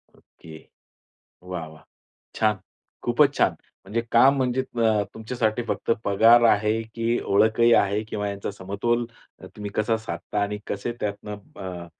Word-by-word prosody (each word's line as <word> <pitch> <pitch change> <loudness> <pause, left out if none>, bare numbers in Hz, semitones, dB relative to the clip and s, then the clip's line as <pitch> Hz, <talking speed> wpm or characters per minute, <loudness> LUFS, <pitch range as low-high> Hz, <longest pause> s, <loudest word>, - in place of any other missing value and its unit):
Okay. 80 -1 -15 0.9
वाह, 90 -3 -5
वाह! 80 0 -15 0.5
छान, 110 -2 +1 0.5
खूपच - - +3
छान! - - +3 0.3
म्हणजे 110 +4 -1
काम 135 +4 +6
म्हणजे 130 -1 0
अ, 115 -4 +1
तुमच्यासाठी 110 0 -1
फक्त - - -2
पगार 115 +4 +6
आहे 105 +1 +2
की 115 +1 0
ओळखही 110 +3 +4
आहे 100 +1 +2
किंवा 105 -1 -3
यांचा 100 0 -4
समतोल 100 +5 -2 0.3
अ, - - -10
तुम्ही 105 -1 -6
कसा 110 +1 +1
साधता 110 -1 -4
आणि 105 0 -2
कसे 100 +4 -3
त्यातनं 105 0 -4 0.2
अ, 90 -2 -6
105 Hz, 140 wpm, -24 LUFS, 100-115 Hz, 0.9 s, काम